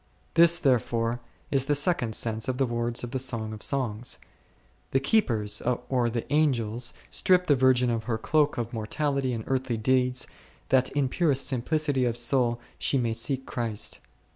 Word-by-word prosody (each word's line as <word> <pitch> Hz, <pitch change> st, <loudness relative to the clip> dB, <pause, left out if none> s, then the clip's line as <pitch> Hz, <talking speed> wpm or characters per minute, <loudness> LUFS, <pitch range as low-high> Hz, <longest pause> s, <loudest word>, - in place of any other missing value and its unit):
This, 170 Hz, 0 st, +6 dB
therefore, 120 Hz, -3 st, +1 dB, 0.3 s
is 135 Hz, -2 st, +2 dB
the 145 Hz, -, +1 dB
second 145 Hz, -, 0 dB
sense 110 Hz, -1 st, 0 dB
of 130 Hz, -1 st, -1 dB
the 135 Hz, -, +2 dB
words 120 Hz, 0 st, -2 dB
of 120 Hz, -, -5 dB
the 130 Hz, -, -2 dB
Song 115 Hz, -4 st, -2 dB
of 110 Hz, -, -9 dB
Songs: 125 Hz, -4 st, -1 dB, 0.7 s
the 135 Hz, -, +2 dB
keepers 125 Hz, -, +1 dB, 0.3 s
or 125 Hz, -3 st, +1 dB
the 115 Hz, 0 st, -3 dB
Angels 120 Hz, -6 st, +1 dB, 0.2 s
strip 180 Hz, -1 st, +2 dB
the 145 Hz, -, +4 dB
virgin 125 Hz, -1 st, +3 dB
of 115 Hz, -1 st, -2 dB
her 115 Hz, -2 st, -1 dB
cloak 150 Hz, +5 st, +1 dB
of 120 Hz, 0 st, -3 dB
mortality 135 Hz, +4 st, -1 dB
and 115 Hz, -2 st, -3 dB
earthly 130 Hz, -3 st, -1 dB
deeds, 125 Hz, +2 st, +2 dB, 0.4 s
that 130 Hz, 0 st, +3 dB
in 140 Hz, -1 st, +1 dB
purest 140 Hz, -2 st, +1 dB
simplicity 140 Hz, +1 st, 0 dB
of 120 Hz, -1 st, -1 dB
soul 120 Hz, 0 st, +1 dB, 0.2 s
she 140 Hz, -, +1 dB
may 120 Hz, -3 st, 0 dB
seek 130 Hz, +4 st, -1 dB
Christ. 115 Hz, -4 st, -4 dB
125 Hz, 165 wpm, -27 LUFS, 115-140 Hz, 0.7 s, This